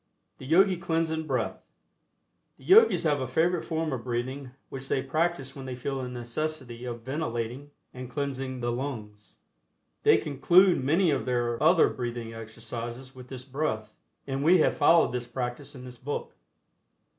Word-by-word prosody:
THE 130 - -9
YOGI 185 +4 +5
CLEANSING 165 -2 -1
BREATH. - - -2 0.9
The - - -19
Yogis 450 - +6
have 145 -4 +1
a 130 - -2
favorite 170 +6 +1
form 160 -2 -2
of 120 -3 -4
breathing 130 +2 -3 0.2
which 135 0 -7
they 130 - +1
practice 155 -2 -1
when 135 -2 -8
they 130 - -4
feel 135 +2 -3
the 125 - -4
necessity 125 0 -4
of 120 -1 -6
ventilating 130 -1 -3 0.2
and 125 -1 -7
cleansing 135 -2 -3
the 120 0 0
lungs. 110 -6 -6 0.7
They - - +6
conclude 170 +4 +4
many 165 +5 +3
of 135 -2 -1
their 120 -2 0
other 165 +2 +6
breathing 120 -2 -4
exercises 115 +3 -7
with 125 -1 -12
this 130 -1 -8
breath, 130 -7 -3 0.3
and 135 0 -2
we 175 +4 +6
have 155 - +3
followed 165 0 +5
this 125 -1 -3
practice 125 +3 -5
in 130 -1 -9
this 125 -1 -11
book. 145 +3 -5
130 Hz, 160 wpm, -28 LUFS, 120-155 Hz, 0.9 s, Yogis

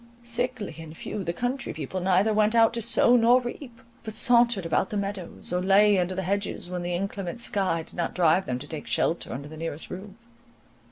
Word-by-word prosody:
Sickly 240 -5 -2
and 160 0 -10
few, 205 - -5
the 170 - -1
country 245 +8 -3
people 160 +4 -4
neither 190 +4 +3
went 215 +1 +2
out 225 0 +5
to 235 - -3
sow 235 +2 +4
nor 240 +1 +5
reap; 245 0 -8 0.2
but 220 -2 -7
sauntered 235 -5 +3
about 165 +3 +1
the 210 - -3
meadows, 195 -3 -4
or 180 - +1
lay 200 +1 +5
under 180 +1 -1
the 190 - -2
hedges, 195 -1 -3
when 180 -1 -3
the 175 0 -2
inclement 195 +1 -4
sky 190 -8 0
did - - -10
not 170 - -2
drive 175 +1 +3
them 125 - -1
to 140 +3 -9
take 155 -1 -7
shelter 170 - 0
under 140 +3 -6
the 155 +1 -10
nearest 165 -1 -5
roof. 195 +2 -8
195 Hz, 210 wpm, -26 LUFS, 175-230 Hz, 0.2 s, out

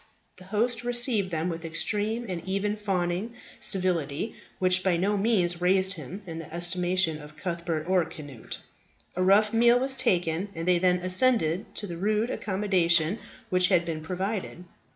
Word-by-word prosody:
The 185 - -13
host 230 +4 -1
received 240 -5 +1
them 165 -1 -1
with 165 -1 -4
extreme 210 +8 -2
and 180 -3 -4
even 195 +2 -1
fawning 195 +1 -2 0.2
civility, 175 -2 0 0.2
which 185 0 +2
by 185 -3 +2
no 200 +4 +1
means 190 -5 +1
raised 190 +1 +3
him 180 +4 -8
in 165 -2 -6
the 165 - -9
estimation 175 -1 0
of 150 +1 -13
Cuthbert 170 -2 -3
or 185 -1 +3
Cnut. 145 -7 -8 0.6
A 185 - -1
rough 205 +3 +4
meal 235 +1 +5
was 265 +1 +1
taken, 175 -3 0
and 165 +1 -4
they 180 -1 +4
then 180 0 +3
ascended 185 -3 +1
to 210 - -3
the 175 -4 -6
rude 215 +5 0
accommodation 185 -2 +1 0.3
which 180 0 +4
had 180 -2 +3
been 160 -2 -4
provided. 185 +2 -4
185 Hz, 160 wpm, -27 LUFS, 170-205 Hz, 0.6 s, meal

